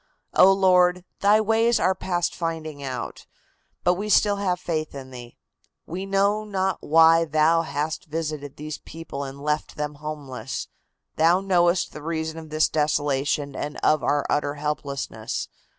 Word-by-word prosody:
"Oh, 190 Hz, -, +7 dB
Lord, 180 Hz, -2 st, +4 dB
Thy 205 Hz, +2 st, +5 dB
ways 225 Hz, +2 st, +2 dB
are 185 Hz, -, +3 dB
past 175 Hz, -2 st, -1 dB
finding 160 Hz, -3 st, -4 dB
out, 130 Hz, -2 st, -6 dB, 0.6 s
but 180 Hz, -, +4 dB
we 205 Hz, +4 st, -4 dB
still 205 Hz, 0 st, +4 dB
have 185 Hz, -3 st, 0 dB
faith 155 Hz, -4 st, -3 dB
in 130 Hz, -1 st, -8 dB
Thee. 120 Hz, -2 st, -11 dB, 0.5 s
We 185 Hz, +4 st, -5 dB
know 200 Hz, +2 st, +2 dB
not 190 Hz, -2 st, -1 dB
why 165 Hz, +1 st, +5 dB
Thou 155 Hz, +1 st, +3 dB
hast 150 Hz, 0 st, -3 dB
visited 155 Hz, -3 st, -4 dB
these 155 Hz, +1 st, -6 dB
people 160 Hz, -4 st, -7 dB
and 135 Hz, 0 st, -7 dB
left 150 Hz, +1 st, -1 dB
them 150 Hz, 0 st, -4 dB
homeless. 145 Hz, -4 st, -5 dB, 0.5 s
Thou 165 Hz, +3 st, +4 dB
knowest 180 Hz, -2 st, +2 dB
the 150 Hz, -, -8 dB
reason 160 Hz, 0 st, -3 dB
of 160 Hz, -1 st, -11 dB
this 155 Hz, 0 st, +2 dB
desolation 145 Hz, -2 st, 0 dB
and 150 Hz, 0 st, -4 dB
of 155 Hz, -3 st, +3 dB
our 145 Hz, +3 st, +1 dB
utter 145 Hz, 0 st, 0 dB
helplessness. 145 Hz, -2 st, -4 dB
160 Hz, 150 wpm, -24 LUFS, 145-180 Hz, 0.6 s, Oh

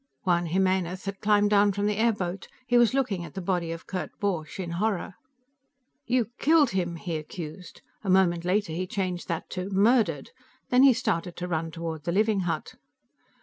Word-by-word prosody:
Juan 175 Hz, -2 st, +1 dB
Jimenez 185 Hz, +1 st, 0 dB
had 195 Hz, 0 st, -4 dB
climbed 205 Hz, -1 st, +3 dB
down 205 Hz, -1 st, +4 dB
from 205 Hz, +1 st, -1 dB
the 210 Hz, -1 st, 0 dB
airboat; 200 Hz, -5 st, 0 dB, 0.2 s
he 245 Hz, -1 st, 0 dB
was 240 Hz, +1 st, +5 dB
looking 220 Hz, -10 st, 0 dB
at 170 Hz, -1 st, -10 dB
the -, -, -3 dB
body 175 Hz, -2 st, -1 dB
of 165 Hz, 0 st, -7 dB
Kurt 185 Hz, -2 st, -4 dB
Borch 180 Hz, -5 st, -2 dB
in 175 Hz, -3 st, -4 dB
horror. 205 Hz, -3 st, -1 dB, 0.9 s
"You 240 Hz, -2 st, +1 dB
killed 305 Hz, -3 st, +4 dB
him!" 175 Hz, -3 st, -1 dB
he 165 Hz, -1 st, -4 dB
accused. 155 Hz, +3 st, -9 dB, 0.2 s
A 195 Hz, -, -3 dB
moment 180 Hz, -2 st, +3 dB
later, 185 Hz, -1 st, 0 dB
he 185 Hz, +3 st, -3 dB
changed 185 Hz, -2 st, -3 dB
that 165 Hz, -1 st, -3 dB
to 185 Hz, +1 st, -4 dB
"murdered." 200 Hz, -, +2 dB, 0.4 s
Then 250 Hz, +1 st, +5 dB
he 270 Hz, -1 st, +8 dB
started 180 Hz, -6 st, -2 dB
to 180 Hz, -, -4 dB
run 165 Hz, -1 st, -2 dB
toward 160 Hz, -2 st, -6 dB
the 170 Hz, -, 0 dB
living 210 Hz, +2 st, +2 dB
hut. -, -, -3 dB
190 Hz, 185 wpm, -27 LUFS, 170-210 Hz, 0.9 s, he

